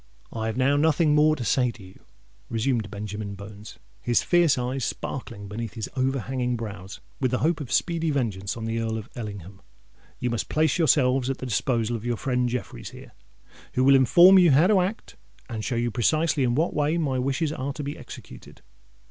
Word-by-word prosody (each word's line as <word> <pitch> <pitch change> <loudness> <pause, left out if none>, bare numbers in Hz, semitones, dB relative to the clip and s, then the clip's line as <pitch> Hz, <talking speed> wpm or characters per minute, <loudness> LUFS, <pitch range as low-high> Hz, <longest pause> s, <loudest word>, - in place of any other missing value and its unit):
"I 110 -1 -3
have 110 - -3
now 135 +2 +3
nothing 155 0 +3
more 155 +1 +4
to 125 - -5
say 125 +5 +2
to 115 -3 -10
you," 95 0 -15 0.5
resumed 115 -2 -1
Benjamin 105 0 -6
Bones, 100 +1 -11 0.2
his 120 - +1
fierce 175 -5 +3
eyes 125 +1 -2
sparkling 115 -6 -5
beneath 110 +2 -6
his 110 -3 -5
overhanging 130 -1 -1
brows 100 -4 -7 0.2
with 130 - +1
the 125 - 0
hope 165 -2 +1
of 130 - -7
speedy 165 -2 +1
vengeance 110 -9 -2
on 115 - -5
the 115 0 -2
Earl 110 -1 -2
of 110 +2 -8
Ellingham. 100 -4 -8 0.6
"You 125 - -2
must 120 - -3
place 160 +3 +1
yourselves 130 -5 +3
at 135 - -2
the - - -6
disposal 120 -1 0
of 110 - -6
your 120 -1 -1
friend 125 -1 0
Jeffreys 120 - -5
here, - - -13 0.6
who 130 - +2
will 135 +1 +6
inform 175 +9 +7
you 175 -2 +6
how 145 +4 +5
to 200 0 +4
act 195 +5 -4 0.3
and 110 -3 -5
show 125 - -2
you 120 0 0
precisely 155 +6 +1
in 120 -1 +1
what 160 +5 +1
way 150 +3 +1
my 140 -6 0
wishes 140 +4 -1
are 140 -1 -4
to 145 - -6
be 145 +1 -4
executed. - - -12
125 Hz, 200 wpm, -25 LUFS, 110-145 Hz, 0.6 s, inform